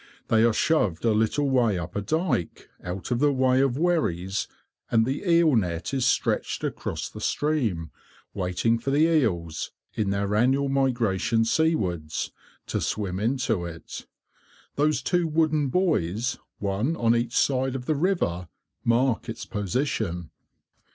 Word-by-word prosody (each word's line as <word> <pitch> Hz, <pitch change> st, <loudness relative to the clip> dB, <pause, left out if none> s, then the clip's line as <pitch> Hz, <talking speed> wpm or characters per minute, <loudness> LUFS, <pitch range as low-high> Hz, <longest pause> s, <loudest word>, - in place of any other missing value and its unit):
They 110 Hz, 0 st, +4 dB
are 115 Hz, -, +5 dB
shoved 105 Hz, -, +1 dB
a 115 Hz, -, +4 dB
little 110 Hz, +7 st, +1 dB
way 120 Hz, -7 st, +2 dB
up 85 Hz, 0 st, -6 dB
a 100 Hz, -, 0 dB
dyke, 155 Hz, -, -2 dB
out 90 Hz, +5 st, -5 dB
of 120 Hz, -, +1 dB
the 145 Hz, +1 st, +4 dB
way 130 Hz, -1 st, +3 dB
of 135 Hz, -2 st, +1 dB
wherries, 110 Hz, -, 0 dB, 0.4 s
and 115 Hz, -1 st, +3 dB
the 135 Hz, +3 st, -2 dB
eel 165 Hz, -4 st, +5 dB
net 90 Hz, -1 st, -1 dB
is 130 Hz, -2 st, +1 dB
stretched -, -, 0 dB
across -, -, -3 dB
the -, -, -10 dB
stream, 115 Hz, -, -1 dB, 0.4 s
waiting 100 Hz, +5 st, 0 dB
for 130 Hz, -, -3 dB
the 140 Hz, +2 st, +3 dB
eels, 95 Hz, -, +1 dB, 0.2 s
in 105 Hz, -3 st, -1 dB
their 100 Hz, +1 st, -1 dB
annual 135 Hz, +6 st, +2 dB
migrations 115 Hz, -4 st, +1 dB
seawards, 90 Hz, -, 0 dB, 0.3 s
to -, -, -2 dB
swim 95 Hz, -3 st, -2 dB
into 115 Hz, -3 st, 0 dB
it. 85 Hz, -1 st, -8 dB, 0.7 s
Those 150 Hz, +1 st, +1 dB
two 175 Hz, -2 st, +1 dB
wooden 155 Hz, -2 st, +2 dB
buoys, 125 Hz, -, 0 dB, 0.2 s
one 105 Hz, +10 st, -1 dB
on 115 Hz, -5 st, +2 dB
each 120 Hz, 0 st, -1 dB
side 130 Hz, -1 st, +1 dB
of 125 Hz, -2 st, -5 dB
the 155 Hz, -, +1 dB
river, 140 Hz, -, 0 dB, 0.4 s
mark 120 Hz, 0 st, +1 dB
its 115 Hz, -, -6 dB
position. 105 Hz, -, -2 dB
115 Hz, 145 wpm, -26 LUFS, 95-140 Hz, 0.7 s, are